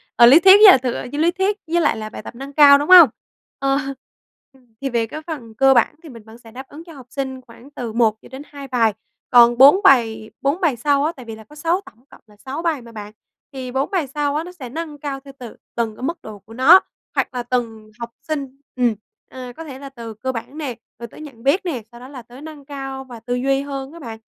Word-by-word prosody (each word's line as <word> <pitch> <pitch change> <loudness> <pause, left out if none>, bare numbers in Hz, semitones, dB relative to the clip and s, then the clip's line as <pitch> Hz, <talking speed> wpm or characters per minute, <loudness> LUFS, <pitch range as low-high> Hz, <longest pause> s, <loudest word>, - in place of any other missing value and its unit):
ờ, 240 - +7
lý 265 +7 +8
thuyết 380 +2 +7
với 415 -2 +9
là - - +6
thực 250 -1 -3 0.2
với 290 - -4
lý 340 +2 +3
thuyết 385 +3 -1
với 340 +1 +1
lại 295 - +1
là 215 0 -6
bài - - -9
tập - - -10
nâng 270 +3 -9
cao, 285 -1 +7
đúng 290 +3 -4
hông? 355 -6 +10 0.5
Ờ, 275 0 +1 0.8
ừm, 250 -4 -27
thì 275 - -2
về 235 -2 0
cái 305 +7 -8
phần 245 -9 -7
cơ 270 +1 +4
bản 255 - +2
thì 320 - -11
mình 230 -4 -13
vẫn 220 +1 -15
sẽ 230 -1 -17
đáp 265 +3 -10
ứng 310 +3 -12
cho 335 -1 -14
học 265 -4 -13
sinh 265 -1 -5
khoảng 245 +2 -17
từ 240 -6 -6
1 225 -2 +2
cho - - -16
đến 265 +2 -8
2 280 -2 -11
bài. 230 -5 +1 0.4
Còn 240 -1 +6
4 280 +9 +7
bài 225 - +3
4 285 +7 -1
bài 320 -8 +1
sau 280 +4 +1
á, 320 - 0
tại 255 - -12
vì 225 -1 -8
là 220 - -13
có 300 +8 -18
6 335 +5 -1
tổng 235 +5 -18
cộng - - -18
là 210 - -21
6 265 +8 -7
bài 325 -6 -1
mà 235 0 -14
bạn, 210 -1 -9 0.4
thì 255 -2 -7
4 265 +6 -2
bài 350 -7 -1
sau 285 +1 -2
á, 310 - -1
nó 360 - -10
sẽ 285 -9 -10
nâng 310 +2 -6
cao 280 -1 -5
theo 275 0 -14
từ 240 -3 -10 0.2
từng 230 -2 -2
cái 250 - -11
mức 335 +5 -3
độ 215 -2 -10
của 215 +4 -16
nó, 295 +10 +7 0.4
hoặc - - -1
là 245 -1 -4
từng 225 -3 -4
học 235 0 -6 0.2
sinh, 275 -4 -5 0.2
ừm, 245 -3 +1 0.3
ờ, 250 -1 -9
có 325 - -7
thể 270 -4 -10
là 275 - -9
từ 235 -4 -9
cơ 260 +5 -4
bản 255 +5 -8
nè, 280 -6 -5 0.2
rồi 235 - -7
tới 235 - -14
nhận 265 -6 -12
biết 330 +8 +1
nè, 270 -10 -3
sau 235 - -14
đó 250 - -11
là 265 -2 -10
tới 245 +4 -15
nâng 305 -3 -11
cao 270 -2 -7
và 245 -3 -12
tư 245 +2 -4
duy 270 +2 0
hơn 275 0 -6
á 335 - -11
bạn. 230 -6 -9
265 Hz, 270 wpm, -20 LUFS, 235-295 Hz, 0.8 s, hông